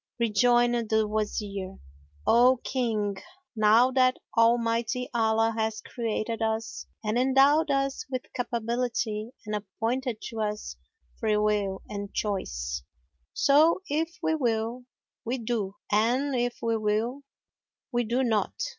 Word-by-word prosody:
Rejoined 240 +1 +3
the 220 -1 +2
Wazir, 205 -2 -3 0.5
"O 250 +3 +5
King, 215 -6 -1 0.4
know 220 +4 +5
that 255 -1 +3 0.2
Almighty 230 +1 +2
Allah 225 -1 +2
hath 220 -1 -2
created 230 -1 -3
us 220 0 -2 0.2
and 215 +3 0
endowed 275 +4 +4
us 275 +1 0
with 255 -1 -3
capability 235 -2 -2 0.2
and 210 - -4
appointed 225 +4 -2
to 225 - -7
us 210 0 -3 0.4
freewill 210 -3 +1
and 200 -1 -6
choice; 65 - -2 0.5
so, 310 +6 +4
if 325 +3 -1
we 320 - +2
will, 240 -3 -1 0.4
we 245 +3 -2
do, 220 -4 -2 0.2
and 245 +7 +2
if 245 0 -1
we 230 -1 +1
will, 220 +5 -1 0.7
we 240 -1 +1
do 240 +4 0
not. 220 - 0
230 Hz, 120 wpm, -27 LUFS, 215-250 Hz, 0.7 s, O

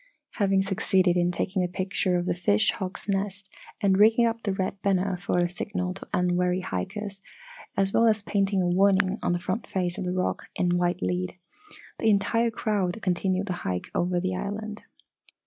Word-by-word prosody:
Having 195 -1 +3
succeeded 190 -2 +2
in 175 0 +2
taking 185 +2 -1
a - - +1
picture 185 0 -1
of 175 - -1
the - - +1
fish 140 - +2
hawk's 190 +1 -6
nest 200 0 -2 0.3
and 195 -2 +3
rigging 225 +3 +6
up 230 0 -1
the 205 - -1
red 190 0 -2
banner 195 -1 +1
for 180 0 -2
a 175 0 +3
signal 180 +1 -3
to 190 - -10
unwary 180 0 +1
hikers, 195 +1 -4 0.6
as 195 0 +1
well 230 - +5
as 215 -2 +2
painting 195 -1 +1
a 180 - +1
warning 190 +2 +3
on - - 0
the 175 - +1
front 185 +5 -3
face 180 -2 -2
of - - -2
the 180 0 -2
rock 185 - -1
in 175 0 +1
white 175 +1 0
lead, 180 0 -2 0.6
the 225 - +3
entire 230 +3 +2
crowd 210 -3 -1
continued 185 +1 0
the 185 - -2
hike 90 -1 -3
over 175 0 +1
the 185 +1 -1
island. 210 +3 -4
190 Hz, 185 wpm, -26 LUFS, 180-200 Hz, 0.6 s, rigging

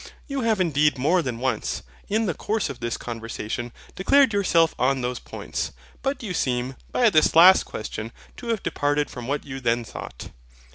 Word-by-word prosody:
You 275 -1 -3
have 225 -3 +1
indeed 150 -5 +2
more 160 +8 +3
than 125 -6 -3
once, 130 +2 -2 0.2
in 220 +2 +1
the 180 - 0
course 210 -5 -1
of 130 - -10
this 120 -1 -2
conversation, 115 0 -5 0.2
declared 265 +5 +4
yourself 170 -5 +3
on 130 +1 +2
those 125 0 -2
points; - - -5 0.3
but 270 -2 -2
you 200 -5 -3
seem, 125 -4 -1 0.2
by 235 -3 +4
this 155 -3 +4
last 180 +3 +8
question, 110 +1 -6 0.3
to 240 - -8
have 225 -3 -1
departed 145 -2 0
from 125 -1 -7
what 145 +2 -2
you 135 -1 -6
then 120 -1 +1
thought. 60 - -9
145 Hz, 180 wpm, -24 LUFS, 125-200 Hz, 0.3 s, last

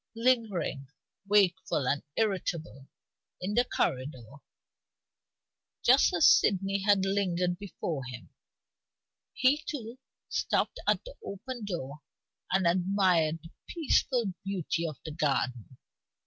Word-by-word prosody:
Lingering, 225 - 0 0.4
wakeful 185 -8 +2
and 145 - +1
irritable, 175 -9 -2 0.5
in 190 +3 -3
the 240 +3 +4
corridor 130 - -2 1.5
(just 260 +3 +5
as 170 - +4
Sydney 195 0 +4
had 195 -1 +3
lingered 180 -2 0
before 170 -7 -4
him), 125 -1 -9 1.0
he 285 +4 +2
too 245 -3 -6 0.3
stopped - - -1
at - - +2
the - - -9
open 230 +4 -6
door 150 -6 -5 0.5
and 190 -1 +2
admired 175 -3 +2
the 165 - -12 0.2
peaceful 255 - +1
beauty 175 -3 -2
of 155 -4 -6
the 160 - -5
garden. 130 -5 -1
185 Hz, 105 wpm, -29 LUFS, 155-210 Hz, 1.5 s, just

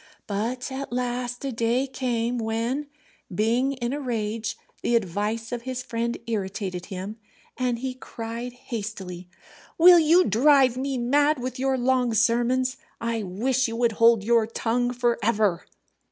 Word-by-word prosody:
But 235 +6 -3
at 270 0 -5
last 245 +1 -2
a 270 - -1
day 235 +3 +1
came 245 -2 -1
when, 230 +6 -2 0.4
being 235 +8 +1
in 245 -1 -3
a 290 - -2
rage, 225 -4 -3 0.2
the 240 - +1
advice 215 +2 -1
of 240 -1 -3
his 255 0 -4
friend 235 -1 -2
irritated 190 -4 -3
him, 195 +2 -6 0.4
and 250 -2 0
he 255 +2 -3
cried 235 -1 -6
hastily, 200 -7 -6 0.5
"Will 350 +1 +9
you 330 +3 +5
drive 260 - +4
me 265 +1 -2
mad 290 +5 +3
with 255 +1 -5
your 265 0 +1
long 250 -2 +1
sermons? 245 +3 +2 0.2
I 230 -1 -1
wish 235 +8 0
you 230 - -4
would 235 0 +2
hold 230 -1 +4
your 230 0 +3
tongue 245 +2 0
for 240 -1 0
ever." 210 -5 +1
240 Hz, 150 wpm, -25 LUFS, 225-255 Hz, 0.5 s, Will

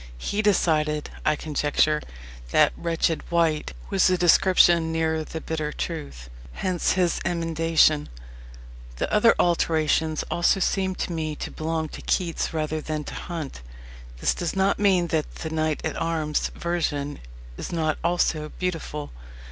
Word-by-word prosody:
He 200 - -1
decided, 155 -7 +1
I 150 - +3
conjecture, 150 0 +1 0.5
that - - +4
"wretched 165 -1 0
wight" 165 -3 +1 0.2
was 195 -2 +4
a 185 - +2
description 175 -1 +5
nearer 160 -1 0
the 160 - -6
bitter 155 -1 -3
truth. 145 - -5 0.3
Hence 185 -2 0
his 180 -2 +1
emendation. 165 -3 +2 0.9
The - - -3
other 220 +2 +5
alterations 160 -2 +1
also 175 +3 +3
seem 190 0 0
to - - -3
me 155 -2 -2
to - - -6
belong 160 0 -2
to - - -9
Keats 170 -3 -1
rather 155 -1 -2
than 155 0 -3
to - - -8
Hunt. 160 - -6 0.6
This - - +2
does 175 +1 -3
not 195 +1 +2
mean 185 -4 +3
that 155 -2 -1
the 160 - -5
"knight 155 -1 -1
at - - -2
arms" 160 -2 0
version 150 -4 -2 0.4
is - - -6
not 160 -2 0
also 165 -3 +1
beautiful. 165 -5 -4
160 Hz, 140 wpm, -25 LUFS, 155-175 Hz, 0.9 s, description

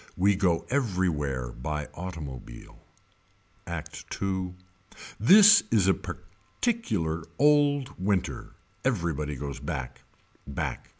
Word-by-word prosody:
We 100 +2 +4
go 90 -4 +1
everywhere 85 - 0
by 75 +5 -4
automobile. 75 -9 -8 0.9
Act - - -6 0.2
II. 95 -2 -2 0.6
This 205 - +8
is 105 -5 +3
a 95 - +6
particular 95 - -3
old 145 -1 +3
winter. 95 -2 -1 0.3
Everybody 85 - -1
goes 70 +1 -5
back. 65 0 -5 0.5
Back. 70 - -4
90 Hz, 95 wpm, -27 LUFS, 75-110 Hz, 0.9 s, This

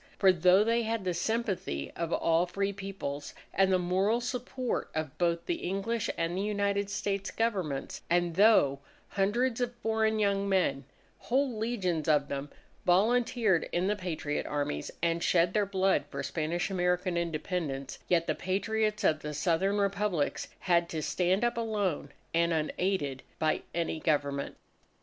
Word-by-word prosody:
For 190 -2 +6
though 185 +3 +5
they 230 +2 +2
had 225 -2 -2
the 180 - 0
sympathy 185 - -2
of 170 -1 -3
all 165 +2 +2
free 195 +2 -1
Peoples, 190 -8 -6 0.2
and 190 0 +3
the 185 - +5
moral 190 +6 +1
support 250 +1 -3
of 155 -4 -3
both 170 -1 +1
the 345 - -1
English 200 - -2
and 165 +1 -1
the 190 - -1
United 200 -1 0
States 195 0 -2
Governments, 190 -12 -2
and 175 0 +2
though 185 -8 +5 0.3
hundreds 230 +5 +1
of 245 0 -1
foreign 220 -1 +1
young 200 -1 +1
men 145 -8 +1 0.3
whole 260 0 0
legions 200 -8 -1
of 150 -2 +3
them 140 +1 -4 0.3
volunteered 215 0 +3
in 175 +1 0
the 205 +2 +1
Patriot 165 -6 -3
Armies 145 - -2
and 170 0 +1
shed 175 0 +3
their 210 -2 +2
blood 190 0 +2
for - - -4
Spanish 170 +4 -2
American 180 0 0
Independence, 160 -5 -3
yet 170 -2 +3
the - - 0
Patriots 215 +3 -1
of 155 -1 +3
the 150 -1 -5
Southern 175 +6 +1
Republics 200 -5 0
had 170 -1 +2
to 155 -2 -3
stand 185 +7 +1
up 240 0 +1
alone 205 -10 -1 0.2
and 170 0 +2
unaided 155 -3 -1 0.2
by 155 -1 +1
any 165 -2 -1
Government. 145 -3 -1
185 Hz, 155 wpm, -30 LUFS, 165-210 Hz, 0.3 s, For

